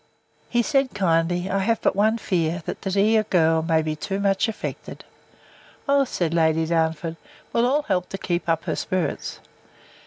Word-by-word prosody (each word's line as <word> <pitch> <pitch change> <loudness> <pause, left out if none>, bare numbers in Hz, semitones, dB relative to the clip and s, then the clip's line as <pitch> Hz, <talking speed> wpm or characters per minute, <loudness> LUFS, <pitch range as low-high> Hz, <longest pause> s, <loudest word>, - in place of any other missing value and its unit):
He 240 0 +2
said, 275 -2 +1
kindly, 175 -1 +1
I 195 0 0
have 225 +3 +1
but - - +1
one 215 +3 +3
fear, 170 -5 -1
that - - -5
the 195 - -3
dear 210 +3 +3
girl 165 -6 +2
may 160 -1 +1
be 155 0 -2
too 195 +5 -4
much 200 +2 +2
affected. 225 - -6 0.8
O, 280 0 +4
said 170 -9 -2
Lady 160 -1 +2
Darnford, 160 0 -1 0.4
we'll 235 +1 +3
all 290 +4 +1
help 180 -5 -1
to 195 - -5
keep 175 -2 -2
up 165 -1 +1
her - - -2
spirits. 185 -3 -3
185 Hz, 175 wpm, -23 LUFS, 165-215 Hz, 0.8 s, O